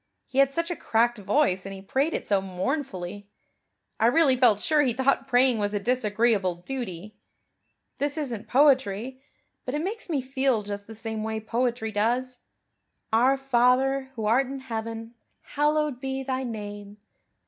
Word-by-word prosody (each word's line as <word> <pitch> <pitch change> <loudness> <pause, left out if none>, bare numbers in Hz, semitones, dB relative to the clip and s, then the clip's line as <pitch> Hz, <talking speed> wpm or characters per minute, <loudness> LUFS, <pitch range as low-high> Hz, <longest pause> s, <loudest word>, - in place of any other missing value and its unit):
He 265 - -2
had 275 0 +5
such 335 +4 -2
a - - -2
cracked 235 -2 +1
voice 200 -2 +1
and 195 0 -7
he 190 - -10
prayed 275 +10 0
it - - -4
so 200 -2 +2
mournfully. 195 - -4 0.7
I 225 - +4
really 275 +1 +4
felt 240 -5 +4
sure 305 +4 +2
he 255 -4 +1
thought 265 +2 +1
praying 250 -2 +3
was 205 0 -1
a - - +1
disagreeable 215 -4 +1
duty. 205 -1 -6 0.9
This 285 +2 0
isn't 245 -8 -3
poetry, 260 -3 +2 0.4
but 255 - -3
it 300 - -1
makes 420 +2 -4
me 300 -4 +1
feel 265 -3 0
just 200 0 -6
the 225 - -9
same 220 -1 -4
way 220 0 -2
poetry 230 0 -1
does. 245 +4 -1 0.7
'Our 255 +4 +4
Father 265 +1 +2
who 220 -2 -3
art 245 +5 +3
in 270 0 -6
heaven 225 -2 -5 0.4
hallowed 295 -2 +1
be 270 0 -3
Thy 260 0 -2
name. 205 -2 -7
245 Hz, 160 wpm, -26 LUFS, 210-270 Hz, 0.9 s, had